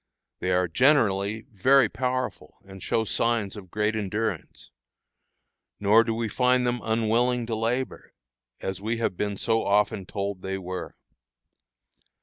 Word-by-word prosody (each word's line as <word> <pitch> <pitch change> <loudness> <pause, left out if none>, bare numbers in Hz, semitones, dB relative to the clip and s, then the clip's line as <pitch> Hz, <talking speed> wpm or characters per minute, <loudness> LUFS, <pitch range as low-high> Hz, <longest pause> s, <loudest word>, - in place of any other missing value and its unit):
They 90 - -2
are 90 0 +2
generally 110 - +2
very 130 +7 +4
powerful, 130 0 -3
and 95 -1 -12
show 110 - 0
signs 115 -2 0
of 95 -3 -10
great 105 +3 0
endurance. 105 -3 -3 1.1
Nor 105 +3 +5
do 115 -1 -2
we 115 0 -1
find 125 +2 +2
them 120 -1 -1
unwilling 115 +2 +1
to 115 -1 -2
labor, 120 +4 -3 0.5
as 95 0 -4
we 110 +3 -1
have 115 -5 -1
been 100 +1 -2
so 115 +2 +1
often 100 -1 +1
told 100 -2 -4
they 95 0 -3
were. 90 -1 -6
110 Hz, 135 wpm, -26 LUFS, 100-115 Hz, 1.1 s, Nor